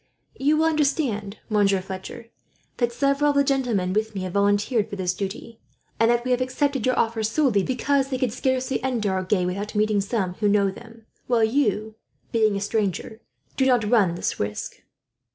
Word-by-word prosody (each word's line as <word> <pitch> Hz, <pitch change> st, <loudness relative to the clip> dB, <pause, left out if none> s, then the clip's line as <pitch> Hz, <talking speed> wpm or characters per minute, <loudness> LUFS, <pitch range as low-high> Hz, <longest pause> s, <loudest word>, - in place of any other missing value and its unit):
"You 295 Hz, +3 st, +3 dB
will 320 Hz, -, +3 dB
understand, 275 Hz, -10 st, 0 dB
Monsieur 200 Hz, -2 st, +2 dB
Fletcher, 190 Hz, +4 st, -8 dB, 0.5 s
that 240 Hz, -1 st, +1 dB
several 280 Hz, +4 st, +1 dB
of 290 Hz, -, +1 dB
the 280 Hz, -, +5 dB
gentlemen 245 Hz, -10 st, 0 dB
with 215 Hz, +1 st, -1 dB
me 190 Hz, -, -3 dB
have 185 Hz, -1 st, -5 dB
volunteered 205 Hz, +2 st, +1 dB
for -, -, -5 dB
this 185 Hz, -2 st, -1 dB
duty, 200 Hz, +4 st, -6 dB, 0.4 s
and 225 Hz, -, +4 dB
that 240 Hz, 0 st, +1 dB
we 255 Hz, -, -1 dB
have 250 Hz, 0 st, +2 dB
accepted 265 Hz, -1 st, 0 dB
your 255 Hz, -, +1 dB
offer 225 Hz, -1 st, +1 dB
solely 220 Hz, -1 st, +2 dB
because 270 Hz, +4 st, 0 dB
they 260 Hz, -, -1 dB
could 250 Hz, -3 st, -1 dB
scarcely 260 Hz, 0 st, -1 dB
enter 225 Hz, -7 st, 0 dB
Agen 185 Hz, 0 st, 0 dB
without 200 Hz, +4 st, -4 dB
meeting 210 Hz, -1 st, +2 dB
some 195 Hz, -3 st, -2 dB
who 210 Hz, -1 st, +2 dB
know 200 Hz, -1 st, +3 dB
them; 225 Hz, +2 st, -14 dB, 0.2 s
while 235 Hz, -2 st, +2 dB
you, 220 Hz, -3 st, 0 dB, 0.3 s
being 220 Hz, -3 st, +2 dB
a 200 Hz, -, -2 dB
stranger, 215 Hz, +1 st, -2 dB, 0.3 s
do 265 Hz, -, +2 dB
not 245 Hz, -5 st, +3 dB
run 200 Hz, -8 st, +3 dB
this -, -, -3 dB
risk." 105 Hz, 0 st, -4 dB
220 Hz, 185 wpm, -24 LUFS, 200-255 Hz, 0.5 s, the